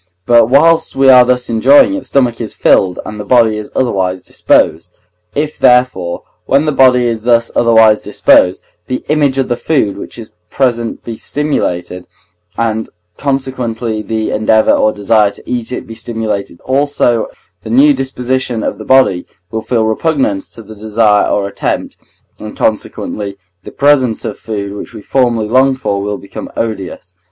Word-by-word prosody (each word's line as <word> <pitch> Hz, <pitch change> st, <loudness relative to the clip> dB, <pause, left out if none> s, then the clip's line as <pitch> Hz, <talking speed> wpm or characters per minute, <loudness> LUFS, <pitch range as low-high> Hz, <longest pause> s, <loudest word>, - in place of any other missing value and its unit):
But 120 Hz, -2 st, +5 dB
whilst 160 Hz, +6 st, +3 dB
we 135 Hz, 0 st, +4 dB
are 125 Hz, -1 st, +8 dB
thus 125 Hz, 0 st, 0 dB
enjoying 270 Hz, -, +4 dB
it, 290 Hz, -, -2 dB
the -, -, -14 dB
stomach 125 Hz, -4 st, 0 dB
is 110 Hz, -, -6 dB
filled 90 Hz, -2 st, +2 dB
and 105 Hz, 0 st, -7 dB
the -, -, -4 dB
body 115 Hz, -1 st, +3 dB
is 105 Hz, -1 st, -6 dB
otherwise 95 Hz, -7 st, -1 dB
disposed. 85 Hz, +3 st, 0 dB, 0.4 s
If, 150 Hz, +1 st, -3 dB
therefore, 125 Hz, -9 st, +2 dB, 0.2 s
when 140 Hz, +3 st, +2 dB
the 155 Hz, -, +1 dB
body 130 Hz, -3 st, +4 dB
is 115 Hz, -2 st, -2 dB
thus 115 Hz, 0 st, +2 dB
otherwise 110 Hz, -2 st, +4 dB
disposed, 90 Hz, +1 st, +2 dB, 0.2 s
the 130 Hz, -, -4 dB
image 145 Hz, -3 st, +1 dB
of 135 Hz, -, 0 dB
the 120 Hz, -, -1 dB
food 110 Hz, -8 st, -1 dB
which -, -, -9 dB
is 115 Hz, -2 st, -10 dB, 0.2 s
present 120 Hz, -4 st, -1 dB
be 115 Hz, -2 st, -7 dB
stimulated, 90 Hz, -13 st, -3 dB, 0.5 s
and 110 Hz, -1 st, -2 dB, 0.3 s
consequently 125 Hz, -5 st, -3 dB
the 110 Hz, 0 st, -3 dB
endeavour 110 Hz, 0 st, +2 dB
or 110 Hz, -, +2 dB
desire 105 Hz, 0 st, +2 dB
to -, -, -14 dB
eat 120 Hz, -1 st, -3 dB
it 125 Hz, -, -5 dB
be 115 Hz, -, -10 dB
stimulated 110 Hz, -5 st, -5 dB
also, 130 Hz, -4 st, 0 dB, 0.3 s
the -, -, -9 dB
new 140 Hz, +6 st, +5 dB
disposition 130 Hz, -3 st, -2 dB
of 100 Hz, -, -3 dB
the 110 Hz, -, -8 dB
body 130 Hz, -9 st, +3 dB, 0.2 s
will 110 Hz, -, -3 dB
feel 115 Hz, -1 st, 0 dB
repugnance 110 Hz, -4 st, -1 dB
to 115 Hz, -, -12 dB
the 110 Hz, -, -12 dB
desire 105 Hz, 0 st, +1 dB
or 100 Hz, -1 st, 0 dB
attempt, 100 Hz, -, -3 dB, 0.4 s
and 105 Hz, 0 st, -9 dB
consequently 105 Hz, -2 st, -3 dB, 0.3 s
the -, -, -10 dB
presence 135 Hz, -5 st, +1 dB
of -, -, -3 dB
the -, -, -24 dB
food 100 Hz, -3 st, -5 dB
which 105 Hz, -, -9 dB
we -, -, -8 dB
formerly 120 Hz, -4 st, 0 dB
longed 130 Hz, +3 st, +2 dB
for 100 Hz, -4 st, -2 dB
will 100 Hz, 0 st, -3 dB
become 100 Hz, -, -9 dB
odious. 95 Hz, -5 st, -5 dB
115 Hz, 170 wpm, -13 LUFS, 105-130 Hz, 0.5 s, are